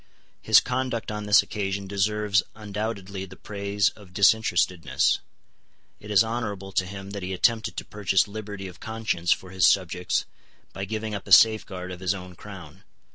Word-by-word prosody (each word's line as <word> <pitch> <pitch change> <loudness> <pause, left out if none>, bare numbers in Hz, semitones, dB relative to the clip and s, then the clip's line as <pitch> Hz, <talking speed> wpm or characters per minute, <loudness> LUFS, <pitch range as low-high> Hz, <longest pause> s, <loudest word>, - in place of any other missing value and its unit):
His - - +7
conduct 125 -3 -2
on 105 0 -5
this 105 - +6
occasion 100 -1 -3
deserves 100 +1 +1
undoubtedly 100 -2 -5
the 95 0 -13
praise 100 0 -1
of 95 -4 -17
disinterestedness. 95 -4 +3 0.8
It 105 - -12
is 105 +1 +5
honourable 105 -4 -4
to 95 -1 0
him 100 +1 -8
that 100 -1 -5
he 95 +1 -4
attempted 110 +4 +1
to - - -4
purchase 100 -2 +1
liberty 100 -2 -7
of 90 -1 -12
conscience 110 -6 -2
for 95 - 0
his 95 -1 +4
subjects 90 -1 +1 0.5
by 95 - -4
giving 110 +1 -4
up 100 - -6
a - - -9
safeguard 95 -3 +5
of 90 - -7
his 95 +1 0
own 90 -1 -9
crown. 95 -3 -11
100 Hz, 165 wpm, -25 LUFS, 95-105 Hz, 0.8 s, His